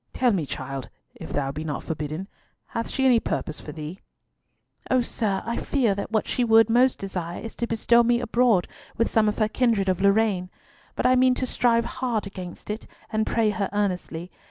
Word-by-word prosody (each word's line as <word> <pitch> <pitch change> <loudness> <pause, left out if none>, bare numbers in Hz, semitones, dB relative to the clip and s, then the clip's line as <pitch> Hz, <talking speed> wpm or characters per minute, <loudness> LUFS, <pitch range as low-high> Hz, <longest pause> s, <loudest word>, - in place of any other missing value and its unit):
Tell 250 -2 +3
me, 165 -7 -1
child, 135 0 -5 0.2
if - - -9
thou 135 -2 -1
be 150 +3 -5
not 150 -3 -4
forbidden, 155 +4 -4 0.4
hath 230 - -3
she 265 - 0
any 245 -3 +6
purpose 155 -7 -3
for 150 - -8
thee?" 155 +4 -7 0.9
"O 255 -1 +4
sir, 210 -4 -1
I 235 - -2
fear 250 -8 +1
that 200 0 -4
what 220 -1 0
she 250 - 0
would 225 -1 +5
most 250 +2 +4
desire 180 -3 -4
is 225 - -7
to 235 - -1
bestow 235 +1 +4
me 235 0 +3
abroad 235 -5 +2 0.3
with 230 - +1
some 215 -1 +4
of 210 - -3
her 215 - +2
kindred 215 -4 +1
of 185 0 0
Lorraine. 200 -2 +2 0.5
But - - -2
I 255 - +5
mean 255 0 +4
to 255 - -1
strive 235 -2 +2
hard 235 -5 -2
against 185 0 -7
it, 215 - -6 0.3
and 215 0 +1
pray 225 -2 +2
her 200 -2 -2
earnestly. 180 -4 -2
215 Hz, 200 wpm, -25 LUFS, 180-235 Hz, 0.9 s, any